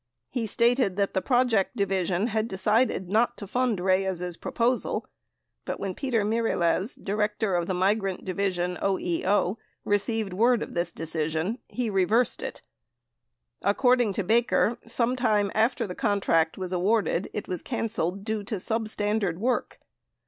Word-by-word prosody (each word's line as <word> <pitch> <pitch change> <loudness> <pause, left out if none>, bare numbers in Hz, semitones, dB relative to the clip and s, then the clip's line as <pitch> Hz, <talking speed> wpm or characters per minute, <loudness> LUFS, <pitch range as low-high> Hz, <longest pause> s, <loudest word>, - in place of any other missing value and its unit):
He 235 -4 -2
stated 235 -2 +2
that 200 0 0
the 190 - +1
Project 245 -4 +2
Division 190 -1 0
had 220 0 0
decided 210 0 +1
not 230 +5 +2
to 205 - -6
fund 240 0 0
Reyes' 185 -1 0
proposal 245 +7 -1 0.6
but, - - -4
when 195 - -3
Peter 245 -4 0
Mirelez, 215 -2 +1
Director 210 0 -1
of 175 -1 0
the 185 - -1
Migrant 195 0 0
Division, 180 -2 -1
OEO, 190 +1 +1 0.3
received 205 0 0
word 235 +4 +3
of - - -8
this 170 -1 -1
decision, 160 +6 -2
he 245 -2 -3
reversed 210 +5 +2
it. - - -6 1.0
Accord 245 +5 +3
ing 220 -4 +1
to 200 - -1
Baker, 230 +2 +2
sometime 230 -4 +1
after 230 +2 +2
the 180 - -5
contract 185 -6 +1
was 185 -1 -4
awarded 195 0 +1
it 210 - -5
was 180 - -3
canceled 200 -6 -2
due 220 0 -2
to 215 - -3
substandard 210 -3 -1
work. 245 +5 -1
205 Hz, 140 wpm, -27 LUFS, 185-230 Hz, 1.0 s, word